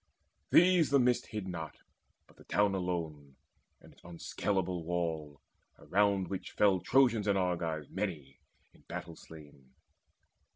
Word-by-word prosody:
These 175 -2 +5
the 140 - +4
mist 125 -2 +2
hid 105 -3 -5
not, 80 -4 -6 0.5
but - - -23
the - - -17
town 105 -1 +2
alone 80 -7 -4 0.5
And - - -17
its - - -23
unscaleable 90 +1 -2
wall, 80 -4 -3 0.4
around 100 -1 +1
which 95 +1 -6
fell 100 -3 +3
Trojans 120 -1 +3
and 100 -1 +3
Argives 85 -5 -1
many 80 -9 -5 0.3
in - - -22
battle 85 - -6
slain. 75 -6 -15
90 Hz, 130 wpm, -32 LUFS, 80-100 Hz, 0.5 s, These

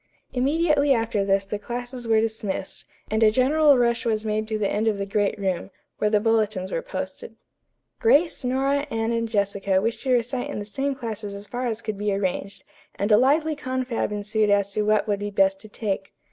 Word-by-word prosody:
Immediately 290 +1 +3
after 225 -3 0
this 195 0 +1
the 205 +1 -4
classes 245 +2 -6
were 225 -1 +4
dismissed, 220 -4 -3 0.3
and 220 +1 +1
a 220 - +7
general 280 +5 +4
rush 235 -1 +2
was 220 -2 -1
made 215 0 -1
to 220 -1 -1
the 210 -2 0
end 210 +3 0
of 215 -2 +2
the 200 - -2
great 205 +1 0
room, 190 -2 -2 0.3
where 210 - +2
the 210 -1 +3
bulletins 215 -4 0
were - - -1
posted. - - -6 0.6
Grace, 340 - +3
Nora, 275 +3 0
Anne 225 -2 -1
and 230 -1 -1
Jessica 200 -2 +1
wished 225 +4 -2
to 265 - -1
recite 245 +1 0
in - - -4
the 205 - -4
same 270 +6 -2
classes 220 -5 -5
as 200 +1 -9
far 245 +4 -3
as 230 -1 -3
could 215 -2 -4
be 210 0 0
arranged, 195 0 -2 0.3
and 205 +2 -1
a 210 - +8
lively 300 +6 +3
confab 260 -5 -2
ensued 210 +1 0
as 200 -1 +2
to 210 - -1
what 215 0 +2
would 205 -1 0
be 205 0 -3
best 195 -1 +2
to 215 - -12
take. 200 -2 -3
220 Hz, 205 wpm, -24 LUFS, 205-255 Hz, 0.6 s, a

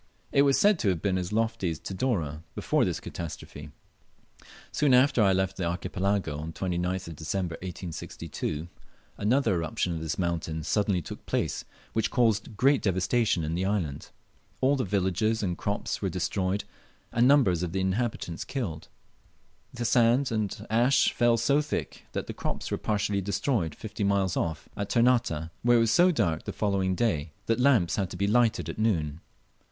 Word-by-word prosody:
It 140 - +4
was 140 -1 +4
said 205 -4 +4
to 100 - +2
have 90 -3 0
been 95 +1 0
as 90 +1 -4
lofty 110 -4 0
as 80 - -3
Tidore 90 - -2
before - - +1
this - - -2
catastrophe. 75 -3 -7 1.0
[Soon 145 -4 +3
after 125 -1 +4
I' 100 -2 +5
left 95 0 0
the 90 - -1
Archipelago, 90 -2 -1
on 80 - -5
the 80 - -9
29th 90 -1 -2
of 80 - -8
December, 85 +3 -3
1862, 85 -3 -5 0.5
another 125 +2 +2
eruption 85 +1 -1
of 80 - -4
this 80 0 -3
mountain 80 -3 -2
suddenly 100 -1 +1
took - - -8
place, - - -1 0.3
which 110 - +1
caused 110 -3 +1
great 135 +3 +4
devastation 95 0 +1
in 80 +1 -2
the 90 +3 -1
island. 95 -9 -2 0.5
All 135 +2 +3
the 130 - 0
villages 100 +3 0
and 90 -3 -1
crops 100 +4 -3
were - - 0
destroyed, 95 +1 -1 0.5
and 120 +2 +4
numbers 125 - +4
of 90 -2 -2
the 95 - -1
inhabitants 95 -3 -1
killed. 95 - -4 0.8
The 120 -1 -4
sand 120 +3 +3
and 110 -3 -2
ashes 120 +4 +3
fell 120 -1 +3
so 140 +6 +3
thick 150 - -4
that - - -2
the - - -6
crops - - -4
were - - 0
partially 105 -1 0
destroyed 100 - -1
fifty 110 -1 -5
miles 100 -2 +1
off, 80 -2 -2
at 100 - -3
Ternate, 115 -10 +2
where 120 0 +5
it - - +4
was 115 -1 +2
so 175 +10 +6
dark 85 - 0
the - - -4
following 95 -3 0
day 85 -9 0
that 115 +2 +1
lamps 125 -10 +3
had 95 -3 0
to - - -7
be 100 - +1
lighted 115 +2 +2
at - - -6
noon. 80 -9 0
100 Hz, 175 wpm, -28 LUFS, 85-115 Hz, 1.0 s, so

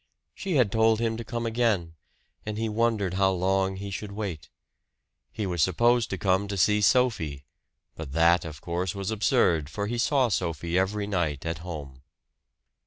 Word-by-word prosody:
She 190 -4 -3
had 125 -8 +3
told 110 0 +3
him 115 -1 0
to 115 - -5
come 115 +1 -4
again; 110 -8 0 0.5
and 105 0 -5
he 115 0 -1
wondered 110 -4 0
how 95 0 +3
long 95 +1 +1
he 100 +1 -6
should 105 +1 -5
wait. 100 -7 -5 0.8
He 105 - -3
was 90 -3 -1
supposed 120 +7 +3
to 95 - -3
come 95 +3 +1
to 100 0 -4
see 105 +3 +3
Sophie 100 - +1 0.5
but 80 -4 -8
that, 85 +1 +4
of 75 -4 -8
course, 90 +2 -2
was 100 +1 -3
absurd, 100 - +2
for 100 +5 -3
he 120 +3 -3
saw 130 0 +2
Sophie 85 -3 -2
every 100 +3 +1
night 80 -8 -2
at 80 0 -3
home. 75 -7 -8
100 Hz, 175 wpm, -27 LUFS, 85-110 Hz, 0.8 s, that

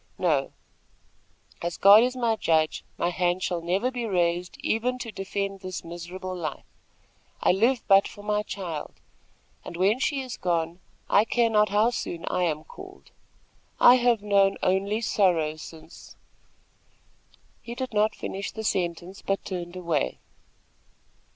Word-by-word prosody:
"No, 150 -7 +1 1.1
as 170 0 -3
God 200 +2 +8
is 250 +1 +1
my 235 -3 +1
judge, 160 -6 +1
my 175 - 0
hand 180 +1 0
shall 175 -3 -1
never 190 +9 0
be 245 -2 -3
raised 175 -2 0
even 245 +3 0
to 235 -2 -6
defend 195 0 -4
this 185 -1 -6
miserable 175 +2 -7
life. 165 -4 -5 0.7
I - - +3
live 230 +7 +2
but 195 -1 +6
for 205 - -12
my 210 0 0
child, 175 -7 -6 0.7
and 170 - -8
when 200 +7 +2
she 275 +1 0
is 255 -2 -7
gone, 170 -1 -1 0.3
I 205 - +5
care 230 0 +1
not 210 -1 +4
how 210 +4 +3
soon 170 -7 -5
I 180 - +1
am 155 -2 -2
called. 380 - -13 0.7
I 250 - +8
have 240 -4 +2
known 200 -1 +3
only 200 +4 +1
sorrow 175 -8 +2
since 160 +1 -12 0.7
" - - -35
He 235 0 -8
did 260 -2 -5
not 210 +1 +2
finish 195 +1 -5
the 220 - -6
sentence, 180 -1 -2
but 195 0 -2
turned 175 -2 -5
away. 170 -5 -1
195 Hz, 150 wpm, -26 LUFS, 175-220 Hz, 1.1 s, God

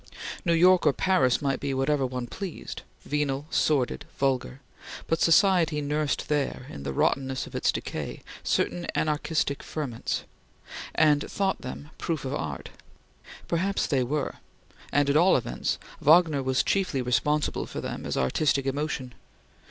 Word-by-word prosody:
New 170 -4 +2
York 180 0 +5
or 145 - +5
Paris 160 -9 +2
might 135 -1 0
be 140 -1 -2
whatever 135 0 +1
one 125 -1 -4
pleased 185 +7 -6 0.2
venal, 145 -1 -1
sordid, 140 -5 +1
vulgar 135 -1 0 0.5
but 165 - 0
society 165 -3 +4
nursed 150 0 -1
there, 145 -3 -1
in 70 - -8
the 70 - -3
rottenness 130 - 0
of - - -13
its - - +2
decay, - - -5 0.2
certain 175 -1 0
anarchistic 150 -2 0
ferments, 135 -7 -3 0.7
and 150 -2 +3
thought 195 -1 -1
them 145 +4 -7
proof 160 -5 -2
of 130 - -3
art. 75 - -4 0.8
Perhaps 190 +4 0
they 135 -4 +1
were; 145 +3 -2 0.5
and 145 0 +3
at 140 - +2
all 175 +4 +6
events, 60 - -2 0.2
Wagner 155 -2 +5
was 130 0 +1
chiefly 180 -10 0
responsible 150 +5 0
for - - -6
them - - -5
as - - -3
artistic 135 - +1
emotion. 135 -2 -2
145 Hz, 145 wpm, -27 LUFS, 130-160 Hz, 0.8 s, all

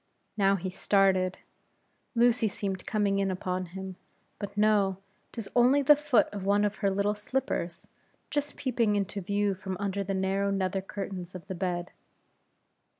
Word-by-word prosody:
Now 195 -1 +3
he 185 0 -4
started; 190 -1 +2 0.8
Lucy 235 -1 +4
seemed 195 -2 -4
coming 205 -2 +1
in 195 -1 +1
upon 185 0 -2
him; 190 +1 -7 0.4
but 205 -1 -6
no 205 -3 +3 0.3
'tis 225 -4 -6
only 255 +4 +5
the 295 +2 +8
foot 295 -4 +3
of 200 -2 -5
one 205 +1 +3
of 210 +1 -2
her 200 - +1
little 200 +2 +1
slippers, 210 -6 -3 0.4
just 290 0 -1
peeping 235 -5 +1
into 200 0 -1
view 200 +1 0
from 190 0 -5
under 200 0 -1
the 195 0 -2
narrow 195 +1 +1
nether 195 -1 0
curtains 190 -2 -6
of 180 - -8
the 195 - -5
bed. 180 -1 -2
195 Hz, 155 wpm, -29 LUFS, 190-210 Hz, 0.8 s, the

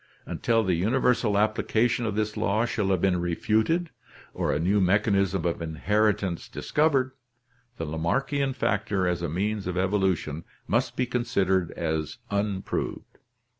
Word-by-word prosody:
Until 115 -1 +1
the 95 -3 +1
universal 115 +3 +2
application 110 +2 +1
of 105 - -2
this 105 0 -1
law 110 +4 +1
shall 105 -4 -1
have 95 -3 +1
been 90 -2 +2
refuted 110 - +1 0.4
or - - -1
a - - +1
new 100 +5 +2
mechanism 100 -1 +2
of 85 -1 -1
inheritance 95 +3 0
discovered, 140 -4 +1 0.7
the 80 - -3
Lamarckian 135 - 0
factor 100 -5 0
as 90 -1 -1
a 85 - -2
means 100 +4 -2
of 90 0 -2
evolution 95 -5 0 0.2
must 120 +3 0
be 125 - +1
considered 100 -8 0
as 80 0 -2
unproved. 100 -1 -3
100 Hz, 135 wpm, -26 LUFS, 90-115 Hz, 0.7 s, universal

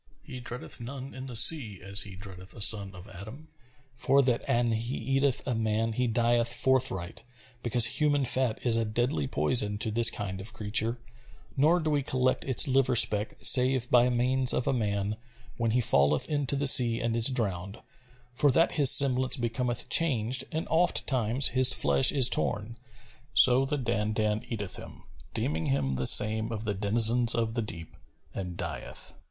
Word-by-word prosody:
He 130 -4 -11
dreadeth 120 0 -9
none 135 +2 -10
in 130 +1 -10
the 125 - -8
sea 115 - +5
as 100 0 +1
he 100 -1 -7
dreadeth 95 -1 -13
a - - -13
son 100 -2 +5
of 90 +2 -13
Adam; 110 - -13 0.4
for 135 +2 0
that 125 -2 -2
an 120 0 -1
he 115 +3 -4
eateth 135 +3 -2
a 130 - -3
man 110 0 -3
he 125 +2 -2
dieth 120 +1 -1
forthright, 125 -10 -2 0.4
because 120 0 +2
human 145 +3 -1
fat 125 -2 -2
is 120 -2 +1
a 115 - -1
deadly 110 - -3
poison 105 - 0
to 110 +1 -3
this 115 +2 +4
kind 95 -2 -7
of 110 +4 -5
creature; 110 +2 -2 0.6
nor 155 +6 +1
do 155 -2 -4
we 145 -1 -1
collect 130 -1 -2
its 130 +3 +1
liver 130 -1 0
speck 105 -2 +1
save 130 -1 +3
by 125 0 +3
means 125 +1 0
of 125 - -3
a - - -1
man, 105 -3 -4 0.4
when 115 -1 -2
he 120 +3 -1
falleth 70 -7 +1
into 145 -2 -3
the 140 +1 -3
sea 120 -4 +4
and 115 -1 -3
is 115 -1 +5
drowned; 100 -6 -3 0.5
for 145 +4 +1
that 165 +6 +1
his 145 -4 +3
semblance 130 -1 +3
becometh 120 0 -4
changed 130 -5 0
and 160 +1 -5
ofttimes 130 -7 +1
his 130 +1 +4
flesh 135 - +3
is 135 -4 +3
torn; 105 0 -2 0.6
so 130 +1 +5
the 145 +2 -3
Dandan 110 -3 -3
eateth 105 -5 -3
him, - - -13 0.3
deeming 80 +2 -3
him 70 -1 -2
the 65 0 +1
same 110 +1 +5
of 110 -1 -6
the 105 -2 -3
denizens 115 +4 +4
of 115 -1 -3
the 120 - -2
deep, 85 -7 -5 0.4
and 90 -3 -8
dieth. 85 -3 -5
120 Hz, 175 wpm, -26 LUFS, 105-130 Hz, 0.6 s, sea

